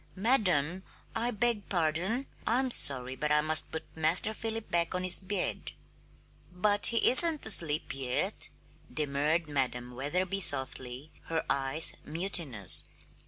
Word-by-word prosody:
"Madam 185 - -1 0.3
I 235 +2 -2
beg 230 -2 -3
pardon 180 - -3 0.2
I'm 255 +3 -1
sorry, 130 - +5
but 150 +2 -5
I 150 0 +1
must 155 +1 +2
put 160 0 -7
Master 165 +7 +1
Philip 225 0 -7
back 170 +1 -2
on 180 - -4
his 185 -1 +7
bed." 195 0 -5 0.8
"But 205 +3 +1
he 230 - +1
isn't 315 +3 +4
asleep 160 -10 +4
yet," 130 -2 -1 0.4
demurred 150 +2 -3
Madam 125 -4 -5
Wetherby 180 +10 -5
softly, 135 -3 -1
her 165 0 -5
eyes 140 +4 +1
mutinous. 155 - 0
165 Hz, 125 wpm, -27 LUFS, 145-205 Hz, 0.8 s, his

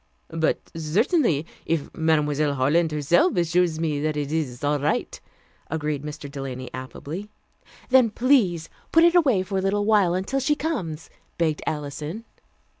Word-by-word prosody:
"But 160 -1 -1
certainly, 165 - +1 0.2
if 160 -3 -2
Mademoiselle 150 -2 +1
Harland 155 +5 +2
herself 150 +5 +2
assures 170 -1 +2
me 155 -3 -1
that 155 0 -1
it 145 -1 -2
is 145 -6 -2
all 145 0 +1
right," 145 +2 -1 0.5
agreed 150 -2 -2
Mr. 150 0 -7
Delany 130 -3 -6
affably. 145 - -7 0.6
"Then 255 -3 +5
please 215 - +2 0.2
put 330 - +6
it 340 0 +6
away 270 - +4
for 190 +1 -2
a - - -1
little 205 +2 0
while 205 -5 +3
until 195 +9 -1
she 295 +3 +1
comes," 195 - -4 0.3
begged 160 -3 0
Alison. 150 +7 -4
160 Hz, 145 wpm, -24 LUFS, 150-200 Hz, 0.6 s, put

